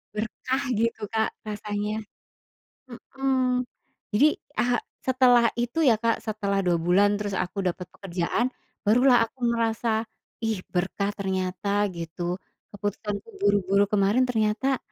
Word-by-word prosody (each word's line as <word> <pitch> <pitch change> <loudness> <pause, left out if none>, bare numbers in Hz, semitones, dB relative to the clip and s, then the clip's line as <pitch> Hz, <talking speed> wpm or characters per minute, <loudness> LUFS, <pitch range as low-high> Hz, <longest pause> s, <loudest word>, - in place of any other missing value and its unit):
Berkah 255 +5 -2
gitu 230 0 0
Kak, 220 +1 0 0.2
rasanya. 210 +1 -3 1.1
Hmm. 255 -2 +1 0.5
Jadi, 295 +8 +4
eee, 240 +1 -1 0.2
setelah 245 -3 +5
itu 240 +7 0
ya 240 -7 +5
Kak, 230 0 0
setelah 200 -3 -1
2 175 -2 +2
bulan, 195 +5 +3
terus 205 -1 -3
aku 190 +1 -2
dapat 180 0 -2
pekerjaan, 195 +7 -2 0.3
barulah 245 +2 +5
aku 255 - -21
ngerasa, 225 -1 0 0.4
ih 215 -4 -1
berkah 190 +2 -1
ternyata, 195 +1 0
gitu. 175 +1 -4 0.3
Keputusanku 205 - -4
buru-buru 200 - +3
kemarin 210 +5 +3
ternyata 225 +3 +1
215 Hz, 115 wpm, -26 LUFS, 195-240 Hz, 1.1 s, setelah